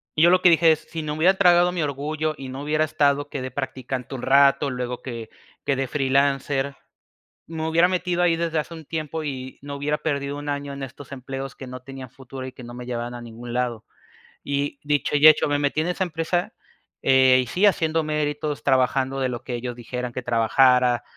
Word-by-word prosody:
Yo 165 +3 +6
lo 185 - +4
que 180 - +7
dije 165 0 +5
es, 155 - +1
si 165 - -4
no 150 -1 -3
me 155 - -6
hubiera 185 +4 +5
tragado 175 -1 +5
mi 180 -2 -2
orgullo 150 +2 -2
y 135 -1 -7
no 135 +2 -6
hubiera 155 +1 +1
estado 145 -1 +1
que 140 - -5
de 130 0 -5
practicante 130 -1 -5
un 125 - -6
rato, 140 +2 +4
luego 125 -1 -4
que 115 -3 -7 0.4
que 140 - +1
de 135 0 -2
freelancer, 140 0 0 0.7
me 160 -1 -4
hubiera 170 +2 +4
metido 180 -1 -1
ahí 165 -2 +3
desde 165 -1 -1
hace 155 +2 -5
un 160 -1 -10
tiempo 155 0 -4
y 130 -2 -6
no 140 0 -7
hubiera 145 +2 -1
perdido 140 -2 -2
un 145 - -7
año 145 0 -3
en 140 0 -6
estos 135 +2 -10
empleos 135 +1 -6
que 135 - -10
no 130 0 -8
tenían 135 -1 -9
futuro 130 +1 -9
y 130 - -9
que 125 - -12
no 120 0 -9
me 125 0 -8
llevaban 120 0 -4
a 120 - -7
ningún 120 +1 -9
lado. 120 -2 -2 0.6
Y 140 0 -2
dicho 145 0 +1
y 150 - +8
hecho, 155 -1 +5
me 145 - +1
metí 145 +2 0
en 165 - -2
esa 185 +1 -1
empresa, 165 +1 -2 0.5
eh, 130 -1 +5
y - - -10
sí 185 - +2
haciendo 160 -5 +2
méritos, 150 -1 -2
trabajando 130 0 +1
de 130 - +1
lo 120 -2 -5
que 125 - -5
ellos 120 0 -5
dijeran 125 +1 -5
que 130 - -4
trabajara, 120 +1 +3
140 Hz, 220 wpm, -23 LUFS, 130-155 Hz, 0.7 s, y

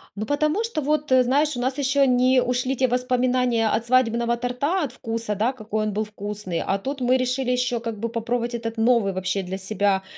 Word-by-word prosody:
Ну, 215 - -4
потому 305 +8 +1
что 455 -9 -2
вот, 300 0 -1
э, 260 -1 +6
знаешь, 280 +3 +1
у - - -3
нас 260 +2 -1
еще 280 0 +3
не 255 +1 +4
ушли 250 +2 -1
те 260 0 +2
воспоминания 250 -1 +1
от 230 +2 -1
свадебного 235 -1 +2
торта, 265 +9 -1
от 275 - -3
вкуса, 230 -3 -4
да, 225 +6 0
какой 215 -2 -3
он 210 - -2
был 215 +1 0
вкусный, 205 -4 -5
а 195 - +1
тут 270 +7 -5
мы 250 +1 +3
решили 255 0 -1
еще 250 -1 0
как 230 -1 -5
бы 230 +2 -2
попробовать 235 +1 -2
этот 230 -1 -4
новый 225 -3 +3
вообще 185 +1 -1
для 190 +1 -5
себя 195 0 0
245 Hz, 210 wpm, -23 LUFS, 220-260 Hz, -, э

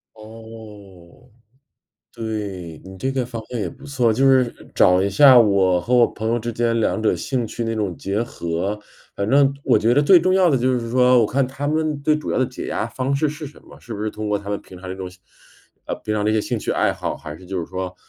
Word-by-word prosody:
哦， 110 -2 -13 0.9
对， 100 -8 -5
你 95 0 -11
这 135 +6 -2
个 130 -2 -1
方 115 -1 -6
向 120 -2 -3
也 - - -2
不 135 +1 -14
错， 125 -5 +1
就 135 +5 +2
是 130 -3 +3 0.2
找 90 0 +4
一 100 - +1
下 130 +6 +7
我 95 -5 +3
和 120 +8 -1
我 120 -1 +6
朋 110 0 -5
友 120 +1 +1
之 120 +1 -4
间 115 0 0
两 110 0 0
者 110 - +2
兴 125 -4 -2
趣 115 - -5
那 115 0 -2
种 100 -6 -2
结 100 +3 -2
合。 95 -2 -3 0.4
反 100 - -3
正 140 +2 +4
我 - - +4
觉 115 +2 +2
得 140 - +4
最 180 +5 +7
重 185 +3 +1
要 185 -1 +4
的 145 - +3
就 130 0 +1
是 115 -1 -6
说， 125 0 +4
我 110 - +3
看 135 +4 0
他 135 +2 -5
们 155 -1 -1
最 150 +1 +2
主 150 - -5
要 - - 0
的 130 - +2
解 125 - -7
压 - - -2
方 130 +1 -2
式 150 +2 +1
是 150 +1 -7
什 145 - -14
么， - - -16
是 120 - -10
不 105 -1 -5
是 110 - -2
通 105 0 -5
过 105 0 0
他 100 0 -10
们 100 0 -2
平 90 - -13
常 90 - -9
那 95 - -4
种 95 -1 -6 0.8
呃， - - -2
平 105 - -1
常 105 -1 -1
这 105 - +2
些 110 - +2
兴 - - -3
趣 - - -4
爱 - - +1
好， - - -4
还 75 -1 -9
是 95 - -15
就 95 0 -4
是 85 - -4
说 95 0 -5
115 Hz, 270 characters per minute, -21 LUFS, 100-130 Hz, 0.9 s, 下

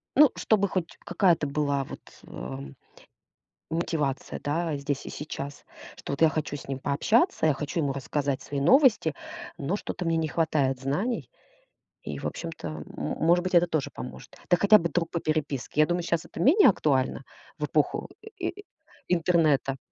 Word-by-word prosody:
Ну, 295 -1 +7
чтобы 200 -2 +2
хоть 180 -3 -3
какая-то 175 -6 +2
была 140 -1 0
вот, - - -9 0.3
а, 65 +2 -7 1.1
мотивация, 160 -5 -2
да, 155 +1 -1
здесь 140 0 -3
и - - -6
сейчас, 145 -1 -6 0.3
что - - -6
вот 140 - -4
я 160 - +8
хочу 155 -2 -3
с 140 - -11
ним 135 -1 -3
пообщаться, 185 - +2
я 155 - +5
хочу 150 +4 -3
ему 140 -3 0
рассказать 140 0 -2
свои 140 +1 -4
новости, 230 - +4 0.4
но 150 +8 -1
что-то 185 - -5
мне 165 -1 +1
не 160 -1 0
хватает 145 -5 +1
знаний. 185 - -2 0.7
И, - - -5
в - - -4
общем-то, 165 -2 -5
м 75 -1 -6
может 170 +2 +1
быть, 185 - -2
это 175 0 +6
тоже 155 -5 -1
поможет. 125 - -9
Да 175 - +5
хотя 200 +4 +6
бы 170 - -1
друг 165 -1 -1
по 170 - -2
переписке. 150 -3 -1
Я 155 - +6
думаю, 175 +2 0
щас 170 -1 0
это - - -9
менее 305 - +6
актуально 135 - +1 0.4
в 150 - -3
эпоху 150 +1 0 0.2
э - - -8
и 410 +2 -4 0.4
интернета. 160 -6 +2
155 Hz, 170 wpm, -27 LUFS, 140-175 Hz, 1.1 s, я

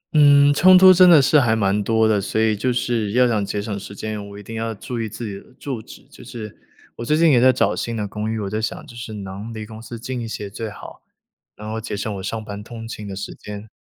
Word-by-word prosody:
嗯， 145 -1 +6
冲 185 +5 +7
突 185 0 +9
真 185 0 +7
的 165 -3 +8
是 150 +3 +5
还 115 -5 +2
蛮 100 -1 +1
多 110 +1 +2
的。 105 -2 +2
所 110 - -2
以 110 -1 +2
就 125 +5 -1
是 120 -4 -1
要 125 +1 +4
想 110 -4 0
节 100 +1 -3
省 100 -1 -4
时 100 +1 -10
间， 105 -1 -5
我 100 - -10
一 105 - -10
定 115 +3 -8
要 115 0 -2
注 115 +4 -5
意 110 - -3
自 110 +3 -7
己 105 - -5
的 - - -20
住 130 -6 -5
址。 - - -14
就 - - -16
是， 110 -3 -8 0.4
我 - - -5
最 150 +6 +1
近 165 -1 +5
也 125 -3 +4
在 130 +1 +7
找 125 - +1
新 115 - -3
的 105 -1 -2
公 105 +2 -4
寓， 110 - -3
我 100 - -3
在 110 +2 -2
想 110 - -4
就 120 - -13
是 115 -1 -7
能 100 +2 -7
离 110 -1 -6
公 110 0 -11
司 115 0 -8
近 125 +1 -5
一 115 - -5
些 105 -2 -6
最 110 +2 -5
好， 105 - -11 0.5
然 105 - -9
后 110 +1 -4
节 105 - -5
省 105 +1 -3
我 - - -6
上 110 +2 -4
班 105 -1 -7
通 115 0 -9
勤 105 -2 -7
的 100 - -6
时 100 - -6
间， 105 +1 -9
110 Hz, 300 characters per minute, -21 LUFS, 105-120 Hz, 0.5 s, 突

